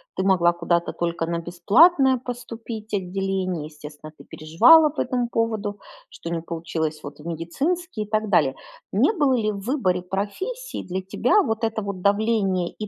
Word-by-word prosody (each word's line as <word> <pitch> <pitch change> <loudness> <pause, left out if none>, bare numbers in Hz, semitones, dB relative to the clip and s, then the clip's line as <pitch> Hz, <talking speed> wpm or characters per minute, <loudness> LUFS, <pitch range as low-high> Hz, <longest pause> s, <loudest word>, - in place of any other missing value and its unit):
ты - - -1
могла 175 -3 +3
куда-то 170 0 0
только 170 -1 -2
на 170 0 -2
бесплатное 260 - +4
поступить 230 -3 -8
отделение. 185 -3 -2
Естественно, 150 0 -11
ты - - -13
переживала 300 - +5
по 290 - -3
этому 245 -2 -1
поводу, 220 -3 -2 0.3
что 325 - -8
не 165 - -2
получилось 160 -2 -4
вот 145 +1 -9
в 150 - -13
медицинский 270 - -2
и - - -11
так 215 -1 0
далее. 140 -8 +3 0.4
Не 235 - +3
было 290 -9 +2
ли 215 -3 0
в 200 - -6
выборе 195 -8 0
профессии 210 - -4
для 185 +1 -4
тебя 245 - +2
вот 220 -3 -2
это 225 -1 -1
вот 200 -2 -5
давление 200 -3 +1
и 215 - -6
200 Hz, 170 wpm, -23 LUFS, 170-235 Hz, 0.4 s, переживала